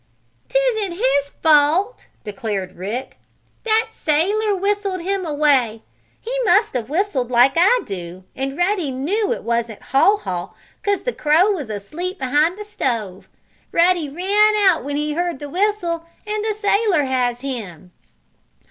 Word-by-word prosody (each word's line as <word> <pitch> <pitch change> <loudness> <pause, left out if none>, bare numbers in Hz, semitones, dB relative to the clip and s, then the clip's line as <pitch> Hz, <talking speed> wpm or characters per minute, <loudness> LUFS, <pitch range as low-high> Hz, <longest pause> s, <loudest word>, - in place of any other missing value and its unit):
"'Tisn't 460 -7 +1
his 340 - +1
fault!" 320 +9 +3 0.2
declared 200 -3 -4
Rick. 210 +8 -5 0.5
"That 445 0 +2
sailor 400 +8 +1
whistled 395 -1 -1
him 380 0 -2
away. 275 -7 +1 0.4
He - - -5
must 425 +2 +3
have 245 -2 -3
whistled 300 - -1
like 250 +2 +5
I 395 +9 +4
do, 180 -1 -7
and 270 +2 -4
Ruddy 355 -4 0
knew 355 - -1
it 480 - -3
wasn't 235 -2 -2
Haw 275 +11 +3
Haw, 180 - -5 0.3
'cause 405 -1 0
the - - -2
crow 320 +7 +3
was 300 - -4
asleep 310 - -5
behind 300 +6 +1
the 420 - -7
stove. 225 - -3 0.4
Ruddy 340 -3 +2
ran 405 +7 +3
out 385 -5 +3
when 285 +1 -4
he 300 +1 -1
heard 345 -1 -1
the 290 +1 -8
whistle, 360 -3 0 0.2
and 425 0 -2
the 435 -1 -1
sailor 405 -5 +2
has 250 -2 -1
him." 205 - -6
325 Hz, 145 wpm, -20 LUFS, 255-405 Hz, 0.5 s, like